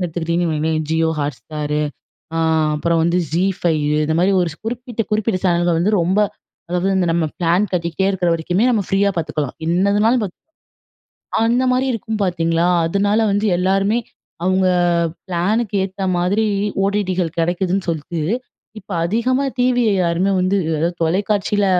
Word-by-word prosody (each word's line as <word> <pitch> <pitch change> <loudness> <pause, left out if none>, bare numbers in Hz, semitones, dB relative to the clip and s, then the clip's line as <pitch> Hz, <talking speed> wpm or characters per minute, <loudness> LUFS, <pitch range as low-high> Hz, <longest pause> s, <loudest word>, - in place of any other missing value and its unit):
எடுத்துக்கிட்டிங்கன்னு 170 0 -1
வைங்களேன். 155 +1 0
Jio 160 0 +2
Hotstar 150 +1 -4 0.7
அ - - 0 0.4
அப்புறம் 165 +2 +1
வந்து 170 +1 +2
Zee5 175 -1 +1 0.3
இந்த 160 - 0
மாரி, 185 +3 +3
ஒரு 170 - -1 0.2
குறிப்பிட்ட 240 -1 -3
குறிப்பிட்ட 215 -2 +1
சேனல்கள் 175 -1 +2
வந்து 210 +5 +1
ரொம்ப 185 +5 +1 0.5
அதாவது 180 +2 0
இந்த 180 - +1
நம்ம 165 -1 +1
பிளான் 175 +4 +2
கட்டிக்கிட்டே 170 +2 -1
இருக்கிற 180 -3 0
வரைக்குமே 175 +5 0
நம்ம 220 -4 +1
ஃப்ரீயா 200 +1 +2
பார்த்துக்கலாம். 150 -4 -2
என்னதுனாலும் 205 +7 +2
பார்த்து 190 - -3 1.1
அந்த 240 +3 +2
மாரி 255 +1 +1
இருக்கும் 220 -1 -4
பார்த்தீங்களா? 165 -2 +1 0.2
அதனால 205 +5 +1
வந்து 205 +2 +1
எல்லாருமே, 195 +5 +1 0.5
அவுங்க 185 0 +2 0.6
பிளானுக்கு 205 +5 0
ஏத்த 195 0 -6
மாதிரி 190 +5 +1 0.4
ஓடிடிகள் 185 -4 -1
கிடைக்குதுன்னு 180 +3 0
சொல்ட்டு, 165 +1 -3 0.6
இப்ப 205 - -17
அதிகமா 245 +8 +1
டிவிய 245 -2 +2
யாருமே 175 +3 +1
வந்து 185 +2 +1 0.3
அ - - 0
தொலைக்காட்சியில 200 +4 +1
185 Hz, 135 wpm, -19 LUFS, 170-205 Hz, 1.1 s, மாரி